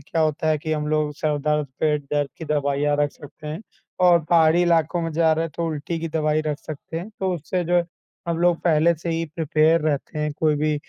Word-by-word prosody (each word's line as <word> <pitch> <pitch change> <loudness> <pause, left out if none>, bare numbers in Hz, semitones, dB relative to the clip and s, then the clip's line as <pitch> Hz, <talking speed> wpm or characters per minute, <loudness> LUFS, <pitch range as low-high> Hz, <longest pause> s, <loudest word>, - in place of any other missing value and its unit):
क्या 160 +4 -3
होता 155 0 0
है 155 -1 +2
कि 155 +1 -3
हम 150 -1 -1
लोग 155 -1 0
सर 150 0 -1
दर्द, 150 0 0
पेट 150 -2 +1
दर्द 145 -1 +1
की 160 - -6
दवाइयाँ 145 -1 0
रख 145 -1 +2
सकते 150 +1 -13
हैं 155 +6 -5 0.4
और 175 -1 +6
पहाड़ी 165 +1 +4
इलाकों 170 0 +2
में 165 - -2
जा 160 0 +3
रहे 160 +1 0
हैं, 165 - -6
तो 170 -1 -1
उल्टी 160 +1 -3
की 165 - -3
दवाई 155 -1 +1
रख 150 -1 -1
सकते 155 +2 -7
हैं। 185 +5 -7
तो 190 -1 0
उससे 175 +3 -2
जो 175 +1 +3 0.5
हम 165 - 0
लोग 175 -1 +3
पहले 170 0 +3
से 170 +1 -5
ही 165 0 -1
प्रिपेयर 160 +1 +3
रहते 150 0 -2
हैं, 150 0 -1
कोई 155 0 +1
भी 155 +1 +1
155 Hz, 230 wpm, -23 LUFS, 150-165 Hz, 0.5 s, और